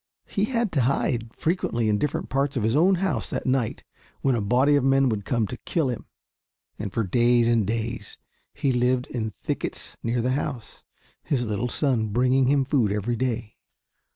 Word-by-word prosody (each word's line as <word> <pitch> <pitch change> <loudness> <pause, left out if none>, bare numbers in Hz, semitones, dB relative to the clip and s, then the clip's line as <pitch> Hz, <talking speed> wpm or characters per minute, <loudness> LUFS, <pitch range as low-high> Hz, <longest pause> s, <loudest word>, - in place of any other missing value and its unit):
He 200 0 0
had 230 -3 -1
to 140 - +1
hide 120 -2 0
frequently 155 -9 0
in 105 -1 +2
different 150 - -1
parts 135 0 0
of 115 - 0
his 110 +3 +1
own 180 +6 +5
house 170 - -1
at - - -2
night 130 -3 0 0.4
when 135 - +2
a 120 - 0
body 130 +7 +3
of 140 - +2
men 135 0 +4
would 105 -3 -2
come 115 -3 +1
to 125 - -6
kill 155 0 -1
him, 120 - -7 0.7
and 100 -2 -4
for 115 - 0
days 120 +4 +3
and 115 -4 +2
days 115 -1 -3 0.3
he 140 -2 0
lived 125 0 +1
in 110 -3 -3
thickets - - -4
near 120 +1 -1
the 125 - +1
house, 135 -3 -4 0.4
his 125 -5 0
little 110 +2 -1
son 125 -5 +1
bringing 125 +4 +2
him 140 0 +3
food 130 -7 +2
every 105 +3 -1
day. 115 -3 -3
125 Hz, 185 wpm, -25 LUFS, 115-135 Hz, 0.7 s, own